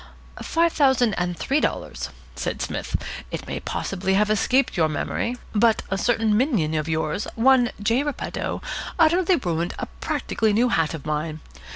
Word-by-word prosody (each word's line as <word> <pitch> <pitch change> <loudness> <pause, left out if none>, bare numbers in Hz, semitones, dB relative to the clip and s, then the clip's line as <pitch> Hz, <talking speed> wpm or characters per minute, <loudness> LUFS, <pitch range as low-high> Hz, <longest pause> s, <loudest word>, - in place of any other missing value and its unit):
"Five 335 0 +2
thousand 265 -6 +3
and 175 -1 -2
three 275 - +1
dollars," - - -2 0.3
said - - -3
Psmith. - - -3 0.3
"It - - -5
may - - -4
possibly 190 0 -2
have 210 +1 +3
escaped 255 +5 +2
your 160 -4 +3
memory, 235 +10 -2 0.2
but 220 +1 +3
a 195 - +1
certain 225 -2 +2
minion 215 - +1
of 155 0 -1
yours, 160 +4 -1
one 245 +1 +5
J. 230 +5 +2
Repetto, 290 -1 -3 0.3
utterly 350 +3 +4
ruined 175 - -2
a - - -3
practically 220 -2 -1
new 240 +4 +3
hat 165 -6 +1
of 150 - -9
mine. 155 +1 -2
215 Hz, 160 wpm, -24 LUFS, 170-260 Hz, 0.3 s, one